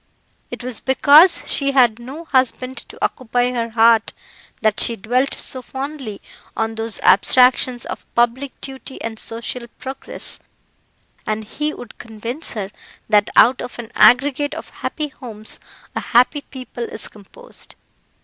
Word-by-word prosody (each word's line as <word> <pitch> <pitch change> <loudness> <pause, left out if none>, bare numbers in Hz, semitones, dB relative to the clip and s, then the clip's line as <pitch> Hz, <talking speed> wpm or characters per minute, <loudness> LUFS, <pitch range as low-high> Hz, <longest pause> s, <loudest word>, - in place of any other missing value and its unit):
It - - -7
was 250 -3 -1
because 295 +6 +6
she 275 -1 0
had 240 -4 +4
no 275 +8 -9
husband 260 -2 0
to - - -12
occupy 245 0 -1
her 235 -2 -2
heart 225 0 +4 0.5
that 215 -2 +2
she 235 - +3
dwelt 250 +6 0
so 260 - -3
fondly 265 -4 -6 0.4
on 225 0 -1
those 225 -1 -1
abstractions 250 +3 +4
of - - -8
public 240 +3 0
duty 265 0 -7
and 225 -1 -5
social 235 +1 -4
progress, 265 +1 -4 0.9
and 215 0 -2
he 300 +8 -3
would 245 -6 -11
convince 230 +6 -4
her 200 -3 -5 0.4
that 210 -1 +4
out 250 +3 +6
of - - -7
an 235 -1 -8
aggregate 285 +3 +4
of - - -8
happy 305 -1 -4
homes 225 -6 -8 0.4
a - - 0
happy 250 +5 +3
people 255 -2 -7
is - - -6
composed. 215 - -10
245 Hz, 140 wpm, -20 LUFS, 225-270 Hz, 0.9 s, because